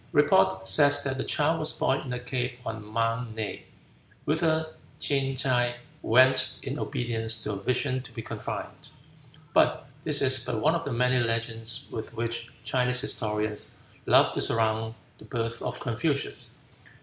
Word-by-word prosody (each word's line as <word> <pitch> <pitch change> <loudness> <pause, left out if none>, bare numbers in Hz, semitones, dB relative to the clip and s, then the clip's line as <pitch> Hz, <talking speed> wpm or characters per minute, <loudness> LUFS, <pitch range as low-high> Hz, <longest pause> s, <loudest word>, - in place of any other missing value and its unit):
Report 95 0 +3
says 145 +8 +6
that 135 -1 -2
the - - 0
child 160 +2 +1
was 155 - +1
born 135 - +1
in 130 - -7
a 125 - -3
cave 125 0 -3
on 110 -1 -5
Mount 115 +2 -2
Ne, 110 -2 -5 0.6
whither 160 0 +1 0.3
Ching 135 -2 0
tsai 120 -2 +1 0.3
went 130 +2 +4
in 135 +2 -4
obedience 115 -4 -2
to - - -2
a - - -3
vision 130 +3 0
to - - -13
be 115 - -7
confined. - - -6 0.6
But - - +3 0.2
this 145 -2 +3
is 130 -2 +5
but 110 - -2
one 155 +7 +3
of 165 -1 -2
the 140 - -3
many 125 +1 +2
legends 115 +2 -1
with 115 +1 -6
which 115 0 -3
Chinese 125 -1 +2
historians 105 -5 -1 0.3
love - - +5
to - - -1
surround 110 0 0 0.2
the - - -13
birth 115 -1 -3
of - - -4
Confucius. 135 +5 -1
125 Hz, 160 wpm, -27 LUFS, 115-135 Hz, 0.6 s, says